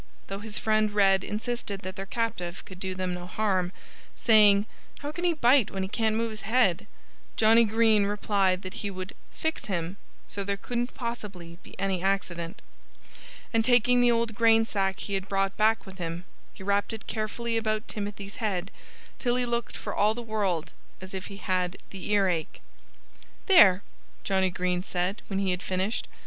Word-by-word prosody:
Though 195 0 -4
his 210 0 -5
friend 215 -1 +2
Red 195 -2 +4
insisted 210 -2 -3
that 185 +1 -6
their 195 0 -6
captive 195 -6 -3
could 185 -1 -11
do 190 0 -3
them 185 -1 -2
no 180 0 -6
harm 185 -3 0 0.4
(saying, 210 -3 +6 0.4
"How 290 +1 -4
can 345 +3 -3
he 345 - +3
bite 255 -4 +4
when 195 -1 -3
he - - -2
can't 220 0 +1
move 230 0 0
his 215 - -7
head?") 210 -5 +2 0.5
Johnnie 225 +1 +6
Green 220 -1 +3
replied 200 -2 +1
that 185 +1 -6
he 205 - -2
would 185 0 -6 0.2
"fix 320 0 -3
him" 180 -2 -3 0.3
so 200 - -4
there 200 0 -2
couldn't 240 +4 -3
possibly 195 -8 -6
be - - -15
any 190 -2 0
accident. 180 -3 -2 0.9
And 225 0 +3
taking 245 0 +4
the 245 - +5
old 230 -1 +1
grain 225 0 +4
sack 195 -3 -1
he 200 - -5
had 195 0 -2
brought 195 0 0
back 220 +1 +2
with 190 -1 -12
him, 170 +1 -4 0.3
he - - -12
wrapped 200 +2 +1
it 220 - -7
carefully 225 +2 -2
around 215 -1 -1
Timothy's 205 -1 -6
head, 195 -4 -2 0.5
till 245 -2 +1
he 250 0 +1
looked 235 -1 -2
for - - -5
all 210 +2 +3
the 240 - -5
world 195 -7 -1 0.3
as 185 0 -10
if 190 -1 -5
he 200 - -9
had 185 -2 -1
the 190 -1 -6
earache. 190 -6 +1 0.9
"There!" 205 - +7 0.4
Johnnie 190 -1 +2
Green 180 0 -1
said, 180 +2 -2
when 195 - -3
he 195 -1 +1
had 180 0 -2
finished. 190 +4 -2
200 Hz, 180 wpm, -27 LUFS, 185-225 Hz, 0.9 s, There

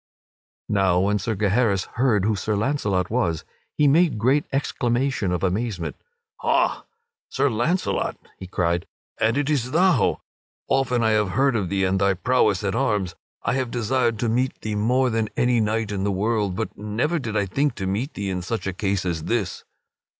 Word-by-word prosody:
Now 95 -3 +2
when 105 +2 +1
Sir 110 +3 -2
Gaheris 100 0 +1
heard 115 -6 +2
who 110 0 +2
Sir 105 +2 -1
Launcelot 100 -6 0
was, 85 -10 0 0.3
he 150 - +4
made 155 -2 +4
great 130 +7 +2
exclamation 125 -5 0
of 90 - -2
amazement. 95 -1 -1 0.4
"Ha, - - +1 0.4
Sir 135 0 +1
Launcelot!" 155 +12 0 0.2
he 95 - -7
cried, 85 -1 -1 0.3
"and 115 +3 +2
is 145 -4 +1
it - - -9
thou! 175 - +3 0.5
Often 125 -3 +1
have 110 -2 +3
I - - -6
heard 135 -1 +3
of 100 -5 -1
thee 95 -1 0
and 95 +1 +1
of 100 - +4
thy 100 - +3
prowess 105 -2 +2
at 95 -1 0
arms! 100 -4 0 0.3
I - - 0
have 130 -2 -1
desired 120 0 0
to 120 - +1
meet 125 +3 0
thee 110 - -3
more 125 +5 +2
than 110 -1 0
any 120 -1 +3
knight 110 0 0
in 100 -1 -2
the 100 - +1
world; 100 -1 0
but - - -4
never 115 +11 -1
did 110 -5 -3
I 100 - +1
think 140 +9 0
to 95 - -4
meet 105 - -2
thee 100 -1 -3
in 90 -1 -2
such 110 +5 -3
a 95 - -2
case 95 0 -1
as 80 -3 -2
this." 105 -7 -2
110 Hz, 185 wpm, -23 LUFS, 95-125 Hz, 0.5 s, he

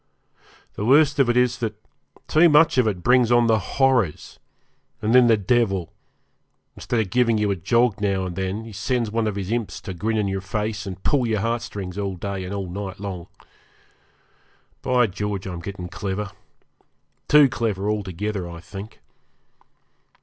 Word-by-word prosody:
The - - -5
worst 145 +4 +4
of 135 -3 +4
it 120 - +2
is 125 0 +2
that 110 -3 -3 0.5
too 165 +2 +5
much 150 -2 +5
of 120 - +3
it 95 -5 -2
brings 125 -1 +4
on 120 -1 +5
the 110 -1 +3
'horrors', 130 - 0 0.6
and 110 +1 0
then 125 -1 +7
the 115 -2 +5
devil, 100 -4 0 0.8
instead 120 - -2
of 105 -4 -2
giving 120 -2 +3
you 105 -1 +1
a - - 0
jog 110 +4 +1
now 100 -2 0
and 90 -2 -5
then, 100 +4 -4
sends 110 +3 -1
one 115 0 0
of 105 - -2
his 100 0 -4
imps 115 -3 -2
to 95 - -6
grin 110 +5 -2
in 105 -2 0
your 95 0 -2
face 105 +1 -3
and 95 -1 -7
pull 130 -4 +2
your 110 -3 0
heartstrings 105 -5 -3
all 100 -2 -2
day 95 +1 -4
and 90 - -6
all 100 -2 -3
night 95 +1 -6
long. 95 -4 -6 1.5
By 125 -2 +3
George, 105 -1 -4
I'm 90 -3 -5
getting 90 +1 -7
clever 100 +2 -4 1.0
too 150 -1 +7
clever, 110 -6 -2
altogether, 100 -2 -3
I 85 0 -8
think. 100 +5 -10
105 Hz, 170 wpm, -23 LUFS, 95-120 Hz, 1.5 s, then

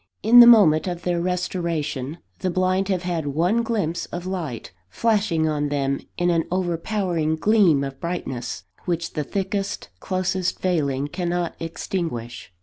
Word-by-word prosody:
In 235 +3 +8
the 240 - +11
moment 190 -9 +6
of 175 -1 -4
their 175 -1 0
restoration, 170 -5 -2 0.2
the 185 - -1
blind 185 +2 +1
have 185 -3 -1
had 170 -4 -2
one 175 +11 +1
glimpse 205 -8 -2
of 175 +1 -6
light, 170 -11 -4 0.2
flashing 205 - +1
on 150 -1 -1
them 140 -1 0 0.2
in 175 0 +2
an 165 -1 +1
overpowering 175 -2 -1
gleam 180 -6 +3
of 135 -1 -6
brightness, 130 - -4 0.2
which 170 -1 -2
the 150 - -2
thickest, 195 +4 -3
closest 185 -1 -1
veiling 145 -7 0
cannot 175 +1 -2
extinguish. 165 - -4
175 Hz, 145 wpm, -23 LUFS, 155-185 Hz, 0.2 s, the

